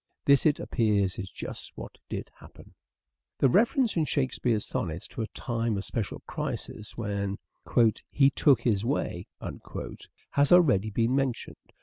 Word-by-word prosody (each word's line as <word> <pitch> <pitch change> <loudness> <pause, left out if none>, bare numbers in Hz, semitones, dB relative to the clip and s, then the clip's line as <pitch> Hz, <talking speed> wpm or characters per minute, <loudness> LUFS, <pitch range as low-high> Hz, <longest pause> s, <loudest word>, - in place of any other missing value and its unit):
This, 140 +1 +5
it 150 - +2
appears, 105 -6 +1
is 95 -1 -5
just - - -8
what - - -9
did - - -5
happen. - - -15 0.6
The 135 - +4
reference 235 - +3
in 160 -3 +2
Shakespeare's 125 -6 0
sonnets 85 0 -3
to - - -5
a 110 - -2
time 115 -3 -2
of 100 - -3
special 110 -5 -3
crisis 105 +1 -5
when 100 -3 -2 0.7
"he 140 -1 +4
took 135 -4 +4
his 110 -4 +1
way" 115 -8 -2 1.1
has 140 0 +3
already 130 - +5
been 115 +4 +1
mentioned. 135 -3 -3
115 Hz, 140 wpm, -28 LUFS, 100-140 Hz, 1.1 s, This